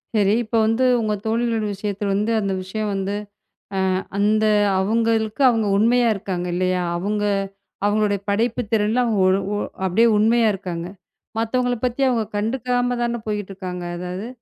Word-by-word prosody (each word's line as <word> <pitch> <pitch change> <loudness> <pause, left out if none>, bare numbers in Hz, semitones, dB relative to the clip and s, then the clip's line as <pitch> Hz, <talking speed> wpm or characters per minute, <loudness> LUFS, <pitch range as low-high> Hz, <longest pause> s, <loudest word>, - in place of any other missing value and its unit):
சரி, 205 -2 +3
இப்ப 230 +1 -4
வந்து 225 +3 +1 0.2
உங்க 215 -2 0
தோழிகளுடய 225 -1 0
விஷயத்துல 200 0 -3
வந்து 210 +3 0
ஆ - - +2
அந்த 195 -1 -1
விஷயம் 210 +3 -3
வந்து 195 +1 -2 0.8
அ - - -2 0.2
அந்த 215 +2 +3 0.4
அவங்களுக்கு 225 +3 +1
அவங்க 225 -3 +1
உண்மையா 235 +3 +3
இருக்காங்க 185 -3 -4
இல்லையா? 185 0 0
அவங்க 205 +4 -2 0.6
அவங்களோட 210 0 +2 0.2
படைப்புத்திறன்ல 225 +1 +1
அவங்க 225 -3 0
ஓரு 190 +1 +3 0.2
ஓரு 205 - -2 0.2
அப்படியே 195 +6 +3
உண்மையா 225 +2 +4
இருக்காங்க. 175 -3 -5 0.5
மத்தவங்கள 245 +2 0
பத்தி 250 +1 -1
அவங்க 235 -3 +1
கண்டுக்காமதான 240 +1 -1
போயிட்டு 210 -2 -3
இருக்காங்க. 180 -2 -6
அதாவது 180 +5 -5
215 Hz, 140 wpm, -22 LUFS, 195-230 Hz, 0.8 s, உண்மையா